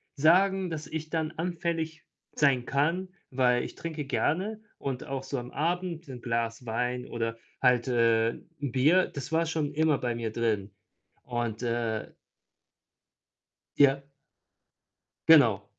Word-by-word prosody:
sagen, 185 Hz, +5 st, +4 dB
dass 155 Hz, -2 st, -5 dB
ich 155 Hz, 0 st, -5 dB
dann 160 Hz, 0 st, -1 dB
anfällig 165 Hz, -2 st, -3 dB, 0.3 s
sein 135 Hz, -4 st, +3 dB
kann, 165 Hz, +7 st, 0 dB, 0.2 s
weil 125 Hz, -1 st, +3 dB
ich -, -, -6 dB
trinke 160 Hz, -3 st, -5 dB
gerne 195 Hz, +10 st, -1 dB, 0.2 s
und 135 Hz, +1 st, -4 dB
auch 135 Hz, 0 st, -3 dB
so 135 Hz, -, -3 dB
am 120 Hz, +1 st, -8 dB
Abend 170 Hz, +1 st, -2 dB
'n 125 Hz, -3 st, -8 dB
Glas 115 Hz, 0 st, -2 dB
Wein 125 Hz, +2 st, -2 dB
oder 115 Hz, -1 st, -2 dB, 0.2 s
halt, 125 Hz, -1 st, +3 dB
äh, 115 Hz, -2 st, +3 dB
'n -, -, -14 dB, 0.2 s
Bier, 155 Hz, +9 st, +4 dB
das 140 Hz, +2 st, -7 dB
war 165 Hz, 0 st, +2 dB
schon 155 Hz, -2 st, -1 dB
immer 155 Hz, -2 st, +3 dB
bei 120 Hz, -1 st, -2 dB
mir 115 Hz, -2 st, -3 dB
drin 110 Hz, -4 st, -1 dB, 0.5 s
und, 120 Hz, -2 st, -3 dB
äh 115 Hz, -2 st, -2 dB, 1.6 s
Ja. 140 Hz, -1 st, +5 dB, 1.3 s
Genau. 120 Hz, -11 st, +7 dB
135 Hz, 135 wpm, -28 LUFS, 120-160 Hz, 1.6 s, Genau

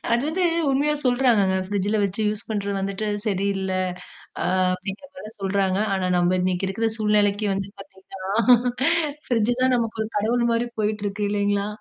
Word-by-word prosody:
அது 240 Hz, +2 st, +2 dB
வந்து 360 Hz, +3 st, 0 dB, 0.3 s
உண்மையா 290 Hz, +3 st, +2 dB
சொல்றாகங்க. 240 Hz, -7 st, +3 dB
பிரிட்ஜ்ல 205 Hz, +1 st, 0 dB
வச்சு 200 Hz, +2 st, -2 dB
யூஸ் 210 Hz, +1 st, -4 dB
பண்றது 200 Hz, -2 st, -2 dB
வந்துட்டு 195 Hz, +2 st, -3 dB, 0.2 s
சரியில்ல. 195 Hz, -1 st, -1 dB, 0.7 s
ஆ. -, -, -1 dB, 0.3 s
அப்டின்ற 195 Hz, +7 st, -7 dB
மாரி 215 Hz, -5 st, -8 dB
சொல்றாங்க. 195 Hz, 0 st, 0 dB
ஆனா, 190 Hz, -1 st, 0 dB
நம்ம 175 Hz, +1 st, +2 dB
இன்னிக்கு 185 Hz, +1 st, 0 dB
இருக்கிற 225 Hz, +4 st, -1 dB
சூழ்நிலைக்கு 210 Hz, -1 st, +2 dB
வந்து 195 Hz, 0 st, -3 dB
பார்த்தீங்கன்னா, 195 Hz, -1 st, -12 dB, 1.1 s
பிரிட்ஜ் 230 Hz, -2 st, +2 dB
தான் 255 Hz, 0 st, +3 dB
நமக்கு 225 Hz, -2 st, -1 dB
ஒரு 220 Hz, -, -4 dB
கடவுள் 235 Hz, +3 st, +1 dB
மாரி 230 Hz, +1 st, +1 dB
போய்ட்டுருக்கு 210 Hz, -1 st, -2 dB
இல்லீங்களா. 205 Hz, 0 st, 0 dB
205 Hz, 145 wpm, -23 LUFS, 195-225 Hz, 1.1 s, சொல்றாகங்க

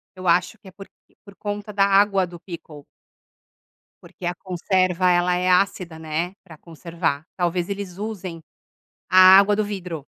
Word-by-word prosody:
Eu 185 Hz, -1 st, -7 dB
acho 180 Hz, +5 st, +1 dB
que 195 Hz, -, -19 dB
é -, -, -17 dB
porq 195 Hz, +1 st, -13 dB, 0.4 s
por 200 Hz, -1 st, -15 dB
conta 205 Hz, 0 st, -6 dB
da 195 Hz, -1 st, +3 dB
água 195 Hz, -1 st, +3 dB
do 175 Hz, -1 st, -12 dB
pickle 160 Hz, -5 st, -11 dB, 1.2 s
Porque 180 Hz, -, -11 dB
a 175 Hz, +1 st, -2 dB
conserva 185 Hz, 0 st, 0 dB
ela 175 Hz, 0 st, +2 dB
é 180 Hz, +1 st, 0 dB
ácida, 180 Hz, -2 st, +1 dB
né, 160 Hz, +3 st, -3 dB
pra 165 Hz, -4 st, -14 dB
conservar. 165 Hz, -2 st, -4 dB
Talvez 175 Hz, 0 st, -1 dB
eles 195 Hz, -3 st, -6 dB
usem 195 Hz, -5 st, -6 dB, 0.7 s
a 185 Hz, +1 st, +8 dB
água 205 Hz, +1 st, +3 dB
do 215 Hz, -, 0 dB
vidro. 180 Hz, -8 st, -6 dB
180 Hz, 160 wpm, -22 LUFS, 170-195 Hz, 1.2 s, a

